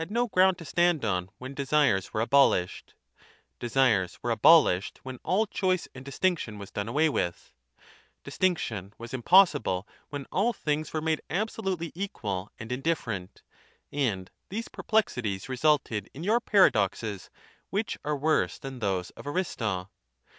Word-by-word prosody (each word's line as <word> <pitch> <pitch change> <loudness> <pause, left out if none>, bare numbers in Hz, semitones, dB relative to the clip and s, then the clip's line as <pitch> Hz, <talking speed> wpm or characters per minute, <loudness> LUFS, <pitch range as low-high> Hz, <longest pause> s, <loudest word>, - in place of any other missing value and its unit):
XXV 225 +7 -1
ground 185 0 +4
to 170 - -10
stand 170 -3 +2
on 90 -3 -1
when 130 +2 -8
desires 140 -8 +1
were 110 - -1
abolished; 120 -8 +2 0.6
desires 115 -7 +2
were 120 - 0
abolished 115 - +5
when 130 -2 -7
all 205 +5 +2
choice 185 -4 0
and 130 - -10
distinc 170 +5 0
tion 105 -2 -6
was 100 -1 -9
done 105 0 -3
away 150 +7 +2
with; 90 - -2 0.7
distinction 115 - -1
was 115 +1 -9
impossible 135 - +4 0.2
when 145 -2 -5
all 225 +6 +2
things 150 -3 -2
were 155 - -2
made 160 0 0
absolutely 190 -3 -2
equal 105 - -4
and 110 +2 -7
in 125 +2 -2
different; 115 - -3 0.5
and 105 -10 -1 0.2
these 225 +4 -4
perplexities 120 - -1
resulted 130 -6 +1
in 155 - -7
your 220 +5 +3
paradoxes, 105 - +2 0.4
which 220 +4 -1
are 150 0 -1
worse 155 +3 +1
than 135 -2 -8
those 95 -4 -1
of - - -12
Aristo. 110 - -2
135 Hz, 145 wpm, -28 LUFS, 105-175 Hz, 0.7 s, abolished